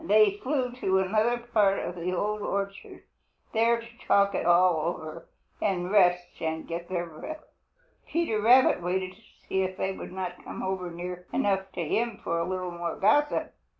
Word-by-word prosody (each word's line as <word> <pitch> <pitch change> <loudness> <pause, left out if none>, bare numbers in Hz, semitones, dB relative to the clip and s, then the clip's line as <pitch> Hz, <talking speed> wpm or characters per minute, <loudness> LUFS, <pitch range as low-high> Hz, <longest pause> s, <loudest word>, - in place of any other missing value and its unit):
They 215 0 +5
flew 260 -2 0
to 190 -6 +1
another 215 +5 +2 0.2
part 200 -3 +4
of - - -3
the 175 +1 -3
Old 210 +3 -1
Orchard, 195 -1 -4 0.5
there 230 +1 +3
to 235 +1 -13
talk 200 0 +4
it 180 - -1
all 175 -2 +4
over 160 +1 -9 0.3
and 180 -1 0
rest 180 -3 +3
and 160 0 -3
get 170 +1 -5
their 175 -2 -1
breath. 240 - -8 0.6
Peter 325 -11 0
Rabbit 245 -2 +6
waited 185 +1 -1
to 205 - -21 0.3
see 190 - +1
if 185 0 -2
they 190 - -1
would 190 - -8
not 180 -1 -5
come - - -6
over 190 -1 -2
near 180 +1 -7
enough 195 -5 0
to 170 -3 -3
him 230 +4 0
for 170 - -1
a 170 - -1
little 185 -1 -3
more 170 -1 -4
gossip. 295 +9 +2
190 Hz, 180 wpm, -28 LUFS, 175-215 Hz, 0.6 s, Rabbit